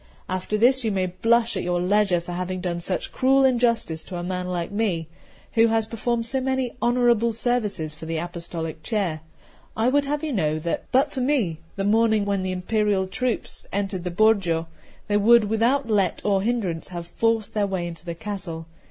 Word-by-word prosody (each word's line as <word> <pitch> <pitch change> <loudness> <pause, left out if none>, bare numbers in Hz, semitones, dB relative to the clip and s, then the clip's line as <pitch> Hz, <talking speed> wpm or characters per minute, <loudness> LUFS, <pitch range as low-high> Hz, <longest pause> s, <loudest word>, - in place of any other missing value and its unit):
After 185 +3 -2
this 255 +4 +4
you 220 - 0
may 190 -2 0
blush 230 +6 +1
at - - -1
your 175 0 0
leisure 190 0 +2
for 175 +1 -8
having 185 +1 -3
done 175 -1 -2
such 180 +2 -2
cruel 270 +1 +3
injustice 235 -10 +1
to 185 - -7
a 175 - -4
man 180 0 -3
like 175 -1 -3
me, 200 -7 -1 0.5
who 230 0 +5
has 225 -1 +1
performed 230 +1 -2
so 265 +3 0
many 260 -2 -1
honourable 240 -1 +3
services 215 -9 0
for 155 +2 -10
the 165 0 -2
apostolic 170 -1 -5
chair. 180 -5 -1 0.6
I 225 +3 +3
would 285 +2 +2
have 295 +2 -2
you 305 -3 -2
know 155 -7 +1
that, 165 +2 -3
but 275 +3 +3
for 265 - -2
me, 245 - +1 0.2
the 195 - -2
morning 220 0 +3
when 200 -1 0
the 185 0 -2
Imperial 195 +1 0
troops 250 +4 -2
entered 195 -2 -2
the 180 - -2
Borgo, 175 -4 +2 0.4
they 205 - +2
would 230 +2 +6
without 230 +5 +1
let 200 -5 +1
or 200 -2 +2
hindrance 200 -7 -1
have 175 -2 -6
forced 225 +4 0
their 210 -2 +1
way 190 -3 -2
into 170 -1 -7
the 170 -1 -5
castle. 185 -4 -5
205 Hz, 195 wpm, -24 LUFS, 175-230 Hz, 0.6 s, would